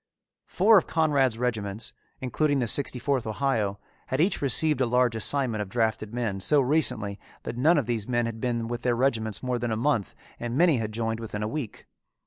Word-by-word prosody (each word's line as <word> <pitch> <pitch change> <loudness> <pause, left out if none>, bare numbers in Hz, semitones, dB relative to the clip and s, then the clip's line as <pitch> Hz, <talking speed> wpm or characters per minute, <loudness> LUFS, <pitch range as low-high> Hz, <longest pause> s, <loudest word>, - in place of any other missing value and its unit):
Four 205 +2 +5
of - - -9
Conrad's 140 -7 +2
regiments, 110 -4 -3 0.3
including 145 +3 0
the 125 - +1
Sixty 130 +2 +1
fourth 130 -1 -1
Ohio, 110 -4 -1 0.3
had 130 - -2
each 180 +5 +1
received 145 +1 +3
a 130 - +2
large 125 -1 +2
assignment 115 -1 0
of 100 - -5
drafted 110 -1 -1
men 115 -5 -2
so 145 +10 +3
recently 125 -8 +1 0.2
that - - -5
none 155 +8 +4
of - - +1
these 115 -3 -2
men 120 -1 +1
had 115 -1 -5
been 120 -2 -1
with 120 0 -4
their 120 -1 +1
regiments 115 -4 -1
more 125 -1 -1
than 120 0 -2
a 110 - -1
month 115 - 0 0.2
and 120 +1 -3
many 165 -4 +4
had 110 -2 -3
joined 115 0 -2
within 105 -2 -5
a - - -1
week. 120 -1 -6
120 Hz, 200 wpm, -26 LUFS, 110-135 Hz, 0.3 s, Four